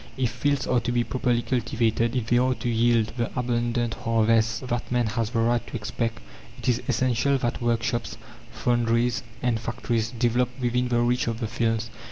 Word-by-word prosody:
If 125 -3 0
fields 140 +4 0
are 125 - +2
to 120 - -2
be 120 -1 +2
properly 125 -1 0
cultivated, 115 -1 0
if 125 -3 0
they 120 +2 +3
are 130 0 +2
to - - -5
yield 115 -1 +2
the 120 -1 0
abundant 120 -1 0
harvests 115 -1 +2
that 120 -2 -3
man 120 -1 +2
has 110 0 -1
the 120 - -3
right 120 +1 +2
to - - -7
expect, 115 +1 -2 0.4
it - - -7
is 125 -2 +2
essential 130 +2 +2
that 120 -2 -2
workshops, 120 0 -1 0.3
foundries, 120 0 +1 0.2
and 120 -2 +1
factories 115 0 -2
develop 120 +1 +1
within 125 0 +1
the 120 -1 +2
reach 120 +1 +1
of 115 -1 -2
the 115 - -2
fields. 115 0 -1
120 Hz, 185 wpm, -25 LUFS, 115-125 Hz, 0.4 s, they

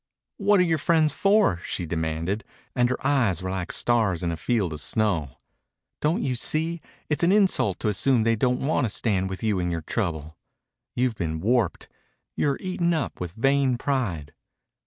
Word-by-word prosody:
"What 205 -1 +3
are - - +5
your 165 -3 +1
friends 155 0 +2
for?" 195 - +3
she 90 - -4
demanded, 80 +5 -2 0.3
and 125 -1 +3
her 130 - -1
eyes 120 - +1
were 95 - -3
like 95 -2 -3
stars 110 -8 +1
in 85 - 0
a - - -2
field 95 -1 -1
of 75 - -5
snow. 85 - 0 0.6
"Don't 155 +4 +1
you 130 -2 -1
see 160 +6 0 0.3
it's 150 - -1
an 170 +1 +4
insult 185 - +2
to - - -1
assume 110 +4 +2
they 115 0 +2
don't 125 +3 0
want 145 -2 +1
to - - -1
stand 95 -3 0
with 95 +2 -6
you 105 -4 +1
in 90 -1 -1
your 85 -2 -3
trouble? 80 -6 -3 0.6
You've 125 -1 +1
been 80 -6 -3
warped. 115 0 0 0.5
You're 140 -2 0
eaten 175 -2 0
up 145 -11 -3
with 90 -2 -4
vain 135 +2 +2
pride." 105 - -2
115 Hz, 180 wpm, -25 LUFS, 90-140 Hz, 0.6 s, are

